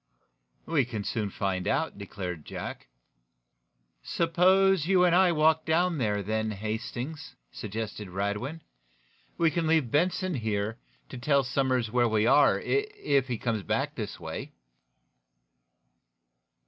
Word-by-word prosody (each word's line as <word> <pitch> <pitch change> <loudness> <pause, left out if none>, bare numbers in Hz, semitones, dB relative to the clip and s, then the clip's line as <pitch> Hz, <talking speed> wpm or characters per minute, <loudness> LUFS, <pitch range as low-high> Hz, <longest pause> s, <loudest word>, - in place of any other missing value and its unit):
"We 155 -5 +2
can 115 -4 -5
soon 105 0 -2
find 95 -2 -2
out," 160 -10 -1
declared 90 -5 -6
Jack. - - -7 1.1
"Suppose 180 - +3
you 185 -1 +4
and 175 -1 +4
I 185 -1 +5
walk 160 0 +3
down 170 0 +1
there, 105 -4 0
then, 110 +2 -1
Hastings?" 110 +8 -5 0.2
suggested 105 -1 -5
Radwin. 105 - -3 0.8
"We 165 -1 +3
can 165 -1 -1
leave 155 -7 +2
Benson 180 +4 +1
here, 110 -4 -2 0.3
to - - -7
tell 140 +2 +3
Somers 125 -3 0
where 120 -1 +3
we 110 0 +2
are, 140 +3 +5
if 415 - 0
he 125 -2 -2
comes 110 -2 -1
back 90 - -1
this - - -6
way." - - -6
125 Hz, 125 wpm, -28 LUFS, 105-165 Hz, 1.1 s, I